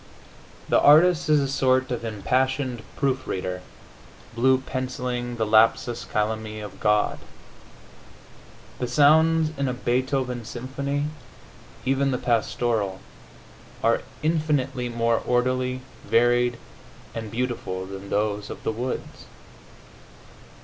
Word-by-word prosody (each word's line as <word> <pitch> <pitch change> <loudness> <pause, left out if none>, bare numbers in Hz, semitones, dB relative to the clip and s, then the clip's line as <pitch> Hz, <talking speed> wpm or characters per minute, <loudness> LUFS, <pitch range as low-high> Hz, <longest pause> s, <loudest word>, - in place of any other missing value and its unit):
The - - +4
artist 155 +3 +6
is 150 -1 +5
a 140 - 0
sort 130 -1 +2
of 120 - -3
impassioned 130 +3 -1
proof 135 -1 -1
reader, 90 -1 -3 0.7
blue 130 +3 +4
pencilling 125 -2 -4
the 115 -1 0
lapsus 115 +2 +3
calami 110 0 -2
of 105 -2 -9
God. 105 0 +2 1.6
The 125 - -1
sounds 155 +4 +4
in 140 - +1
a 125 - -1
Beethoven 125 0 -1
symphony, 140 +5 -3 0.8
even 135 +1 +2
the 130 - 0
Pastoral, 115 -4 0 0.8
are - - +3 0.2
infinitely 145 -6 0
more 115 -1 +1
orderly, 125 +1 0 0.2
varied 120 +1 +3 0.6
and 110 -2 -5
beautiful 115 -6 -3
than 95 +1 -8
those 105 0 -1
of - - -8
the - - 0
woods. 125 +3 -5
125 Hz, 110 wpm, -25 LUFS, 110-130 Hz, 1.6 s, artist